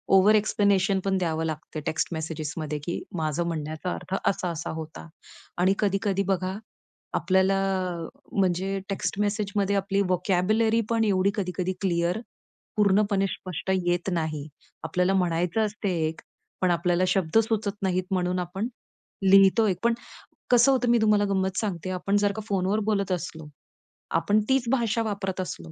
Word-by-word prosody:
Over-explanation 200 -1 +4
पण 195 -1 +1
द्यावं 165 -3 -1
लागतं 155 0 -5
टेक्स्ट 160 - 0
मेसेजेसमध्ये, 155 -1 -4
की 170 - -3 0.2
माझं 155 +1 0
म्हणण्याचा 155 +2 -3
अर्थ 190 - -5
असा-असा 175 -4 -1
होता. 160 +1 -8 0.5
आणि 185 +2 +3
कधी-कधी 195 -1 +1
बघा 190 0 -1 0.6
आपल्याला, 190 +1 +2 0.7
म्हणजे 190 0 0
टेक्स्ट 195 0 -2
मेसेजमध्ये 205 -1 0
आपली 195 0 +1
व्होकॅब्युलरी 195 +5 +2
पण 230 -1 +2
एवढी 195 -1 +2
कधी-कधी 185 -2 -2
क्लिअर, 175 +1 +1 0.6
पूर्णपणे 200 -1 +3
स्पष्ट 185 +1 -4
येत 175 +1 0
नाही. 155 -3 -2 0.4
आपल्याला 180 +4 +1
म्हणायचं 180 +3 +1
असतं 210 0 -4
एक, 160 -2 -1 0.4
पण 185 - +3
आपल्याला 175 +1 +1
शब्द 185 0 +1
सुचत 220 -2 -1
नाहीत, 185 -1 +1
म्हणून 180 -1 0
आपण 180 +5 -3 0.6
लिहितो 195 +3 +6
एक. 185 -3 0
पण 235 0 +4 0.6
कसं 245 +2 +6
होतं, 250 -2 +2
मी 240 0 +5
तुम्हाला 210 -1 +4
गंमत 190 -1 0
सांगते, 185 -5 -3
आपण 195 +2 0
जर 205 0 +2
का 220 - -5
फोनवर 195 +2 +1
बोलत 200 -2 0
असलो. 160 -3 -5 0.7
आपण 200 +6 +2
तीच 265 -2 +2
भाषा 235 -4 +1
वापरत 195 -3 -3
असलो, 85 - -6
190 Hz, 140 wpm, -26 LUFS, 175-205 Hz, 0.7 s, लिहितो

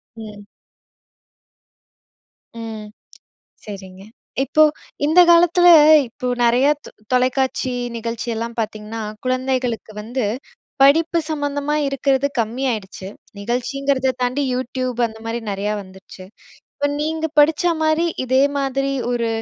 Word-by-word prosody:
ம். 210 -2 -10 2.2
ம். 220 -2 -7 0.8
சரிங்க. 190 -2 -10 0.4
இப்போ 310 +3 +3 0.4
இந்த 320 +4 +5
காலத்தில 345 +1 +5 0.4
இப்போ 250 +3 -7 0.2
நெறையா 245 +4 +4
தொ - - -10 0.2
தொலைக்காட்சி 255 0 +1 0.2
நிகழ்ச்சியெல்லாம் 230 0 -4
பார்த்திங்கன்னா 215 +1 -5 0.2
குழந்தைகளுக்கு 255 -3 -2
வந்து 235 +3 -3 0.6
படிப்பு 320 +5 +4
சம்மந்தமா 290 -1 -2
இருக்றது 275 0 +1
கம்மியாயிடுச்சு. 220 -5 -3 0.3
நிகழ்ச்சிங்கிறத 260 +4 -1
தாண்டி 255 +3 0
YouTube 255 -1 -3
அந்த 220 -1 -11
மாரி 230 +1 -3
நெறையா 200 +1 -2
வந்துருச்சு 190 0 -14 0.5
இப்ப 285 - -1
நீங்க 320 +1 -1
படிச்சா 320 +4 +4
மாரி 315 +2 +2 0.2
இதே 260 +1 +3 0.2
மாதிரி 275 0 -1 0.2
ஒரு 235 -1 -1
255 Hz, 100 wpm, -20 LUFS, 225-280 Hz, 2.2 s, இந்த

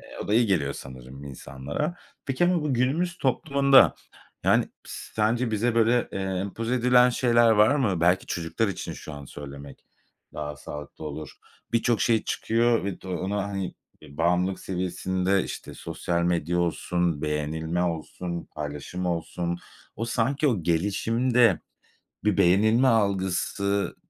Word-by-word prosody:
Eee, - - -12
o - - -10
da 105 - +2
iyi 120 +1 +4
geliyor 75 -9 +1
sanırım 65 +1 -10
insanlara. 70 - -4 0.3
Peki, 145 +6 +2
bu 175 -4 +1
bu 140 -4 0
günümüz 165 +9 0
toplumunda, 140 0 +4 0.5
yani, - - +3 0.2
pıs - - -9 0.2
sence 115 +3 +1
bize 115 +2 +1
böyle, 115 +1 +3
eee, - - -3
empoze 95 +5 -2
edilen 125 0 +5
şeyler 120 -2 +4
var 110 +5 +5
mı? 100 - +1
Belki 90 +2 +3
çocuklar 85 +6 -1
için 95 - -4
şu 75 - -9
an 70 -1 -8
söylemek 70 0 -10 0.5
daha 75 -1 -5
sağlıklı 75 +3 -9
olur. 75 -1 -6 0.4
Birçok 115 0 +2
şey 115 -3 +2
çıkıyor 115 -1 +1
ve 100 -2 -4
de - - -10
ona, 95 +3 -2
hani, 100 -2 -4 0.3
eee, 70 -2 -14
bağımlılık 90 +3 +1
seviyesinde, 95 +1 -1
işte, - - -7
sosyal 85 -1 -2
medya 85 0 0
olsun, 85 -2 0
beğenilme 80 +3 -1
olsun, 85 +1 -3
paylaşım 75 +4 -5
olsun. 85 +1 -2 0.4
O, 115 - -2
sanki 130 +5 +1
o 105 -10 0
gelişiminde 115 +8 +2 0.6
bir 105 -3 +2
beğenilme 110 +7 +4
algısı, 100 -2 0
95 Hz, 140 wpm, -26 LUFS, 85-115 Hz, 0.6 s, edilen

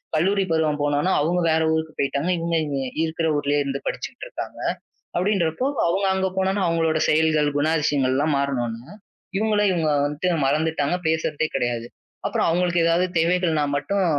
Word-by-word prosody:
கல்லூரி 195 +5 +2
பருவம் 155 -2 +1
போனவுடனே 145 +5 +1
அவங்க 175 +4 +1
வேற 160 0 +2
ஊருக்குப் 160 -1 -3
போயிட்டாங்க. 140 +4 0
இவங்க 165 0 0
இங்க 140 -2 -2 0.2
இருக்கிற 160 0 -1
ஊர்லயே 145 0 +1
இருந்து 140 0 -3
படிச்சுகிட்டு - - -5
இருக்காங்க. - - -7 0.6
அப்டின்றப்போ 185 - 0 0.2
அவுங்க 195 +3 +1
அங்க 190 0 0
போனவுடனே 190 +1 +1
அவுங்களோட 165 -1 +1
செயல்கள், 155 -1 +3
குணாதிசயங்கள்லாம் 145 -2 +1
மாறினவுடனே 125 - -3 0.4
இவுங்களை 210 -1 +2
இவுங்க 165 -3 0 0.2
வந்துட்டு 150 +5 -1 0.2
மறந்துட்டாங்க. 150 +1 0
பேசுறதே 160 -1 0
கிடையாது. 120 -1 -1 0.4
அப்புறம் - - 0
அவங்களுக்கு 175 0 +1
ஏதாவது 170 +2 +3
தேவைகள்னா 165 -2 +2
மட்டும் 190 +7 0
160 Hz, 140 wpm, -23 LUFS, 145-180 Hz, 0.6 s, செயல்கள்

